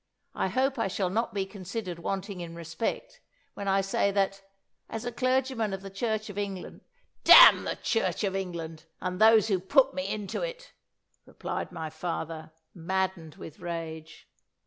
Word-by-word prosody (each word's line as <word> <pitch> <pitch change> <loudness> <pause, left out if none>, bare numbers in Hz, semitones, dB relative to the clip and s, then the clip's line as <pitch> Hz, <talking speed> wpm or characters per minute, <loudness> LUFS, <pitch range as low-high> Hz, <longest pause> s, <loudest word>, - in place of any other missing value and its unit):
I - - -1
hope 260 +6 0
I 225 - +1
shall 185 -1 -1
not 230 +4 0
be 195 -2 -1
considered 190 -1 -6
wanting 195 +1 -4
in 170 -1 -7
respect, 170 - -4 0.3
when 200 - -6
I 195 0 +3
say, 195 +1 +1
that, 195 0 0 0.5
as 225 +1 -5
a 245 - -2
clergyman 255 -3 0
of 195 0 -5
the 195 - -8
Church 215 +2 -2
of 205 -1 -6
England 195 -2 -5 0.2
" - - -46
"Damn - - +10
the - - -2
Church 460 - -1
of 195 -2 0
England, 165 -4 -5
and 180 +2 -4
those 220 -1 +7
who 190 -3 +2
put 270 +8 +3
me 275 0 -3
into 210 -3 -4
it!" - - -6 0.5
replied - - -5
my 160 -2 -5
father, 160 -1 -5 0.2
maddened 180 -2 -2
with 155 - -11
rage. 160 -2 -7
195 Hz, 170 wpm, -28 LUFS, 175-225 Hz, 0.5 s, Damn